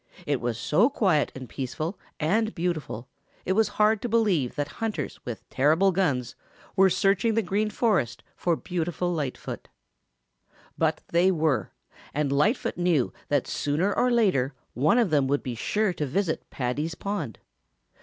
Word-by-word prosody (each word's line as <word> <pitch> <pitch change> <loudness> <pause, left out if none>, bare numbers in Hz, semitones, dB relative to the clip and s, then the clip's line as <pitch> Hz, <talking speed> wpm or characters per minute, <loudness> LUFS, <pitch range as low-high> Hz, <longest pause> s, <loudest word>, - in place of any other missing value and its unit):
It 145 -4 0
was 120 -1 -1
so 165 - +3
quiet 190 - +2
and 130 -1 -7
peaceful 145 - -4 0.2
and 215 +8 +1
beautiful 155 -9 -3 0.4
it - - 0
was 220 +1 +3
hard 215 0 +4
to 240 - -3
believe 200 - +2
that 145 -1 -1
hunters 210 -11 -3
with 115 -5 -6
terrible 160 +8 +4
guns 145 -10 0 0.4
were 190 -1 +6
searching 200 +4 +2
the 225 - +2
Green 205 +3 0
Forest 190 - 0
for 175 -2 +1
beautiful 175 +1 -2
Lightfoot. 145 -6 -4 1.1
But 160 -1 +1
they 175 +2 +4
were, 155 - +1 0.5
and 145 -2 0
Lightfoot 195 - +1
knew 175 -7 +2
that 145 -3 +1
sooner 165 +8 0
or 250 - +3
later 185 - +2 0.2
one 150 - +3
of 230 -8 +3
them 145 -3 +3
would 140 +1 0
be 125 - -3
sure 205 - 0
to 150 -3 -2
visit 170 +4 -1
Paddy's 145 +6 -2
pond. 170 - -4
165 Hz, 155 wpm, -26 LUFS, 140-200 Hz, 1.1 s, were